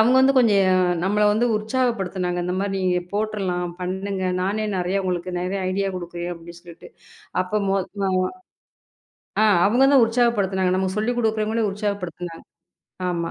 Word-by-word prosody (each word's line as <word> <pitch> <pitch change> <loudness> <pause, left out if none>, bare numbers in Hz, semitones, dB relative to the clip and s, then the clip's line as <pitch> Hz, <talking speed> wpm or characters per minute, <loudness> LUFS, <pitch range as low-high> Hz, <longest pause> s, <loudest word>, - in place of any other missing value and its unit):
அவுங்க 245 +4 +5
வந்து 270 +1 +4
கொஞ்சம், 205 -5 +4
ஆ - - +4 0.3
நம்மள 205 +2 +1
வந்து 225 +4 +2
உற்சாகப்படுத்துனாங்க. 205 -6 -1
இந்த 180 +1 -2
மாரி 200 0 -1
நீங்கப் 180 -1 0
போட்டுரலாம், 195 -4 -2
பண்ணுங்க. 190 +1 -3 0.2
நானே 215 +3 -1
நறையா 185 +2 0
உங்களுக்கு 180 0 -2
நெறைய 190 +2 -2
ஐடியா 195 +1 0
குடுக்குறேன் 175 0 -5
அப்டி 170 +1 -12
சொல்ட்டு. 170 -2 -13 0.5
அப்போ 200 +3 -1
மொ 195 - +2 0.3
அ - - 0 1.3
ஆ, - - +5 0.2
அவுங்க 245 +6 +4
தான் 265 -4 +7
உற்சாகப்படுத்துனாங்க, 205 -6 +1
நமக்கு 190 0 -1
சொல்லிக் 240 +3 0
குடுக்குற 220 -2 +1
முன்னாடி 225 -1 +1
உற்சாகப்படுத்துனாங்க. 180 -5 -5 0.6
ஆமா 170 -1 -2
195 Hz, 150 wpm, -23 LUFS, 180-215 Hz, 1.3 s, தான்